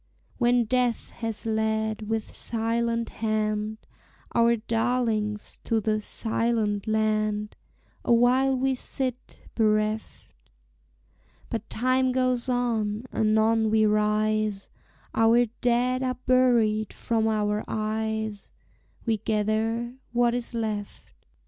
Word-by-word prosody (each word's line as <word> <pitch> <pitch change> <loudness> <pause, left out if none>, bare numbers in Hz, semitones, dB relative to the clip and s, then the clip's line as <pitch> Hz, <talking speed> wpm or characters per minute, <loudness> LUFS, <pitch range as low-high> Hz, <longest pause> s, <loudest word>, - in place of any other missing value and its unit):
When 240 -1 +3
death 245 0 0
has 225 -2 -5
led 220 -1 -1
with 225 -1 -3
silent 230 0 -1
hand 215 -1 -1 0.6
Our 235 0 +4
darlings 225 -2 -1
to 225 - +1
the 215 0 0
"Silent 220 -2 -1
Land," 215 -1 0 0.5
Awhile 250 +3 +4
we 265 +1 +1
sit 255 0 -5
bereft; 215 -1 0 1.2
But 225 -1 -4
time 255 +2 +1
goes 255 -1 0
on; 230 -3 0
anon 220 +1 +3
we 215 0 +3
rise, 210 -1 +1 0.4
Our 230 +2 +4
dead 245 +2 0
are 255 -1 -1
buried 235 -5 +3
from 225 -1 0
our 210 -1 0
eyes, 220 -1 -3 0.5
We 225 -2 +1
gather 220 +3 -1 0.2
what 240 0 +3
is 245 0 -4
left. 215 -3 -5
220 Hz, 100 wpm, -26 LUFS, 215-240 Hz, 1.2 s, Our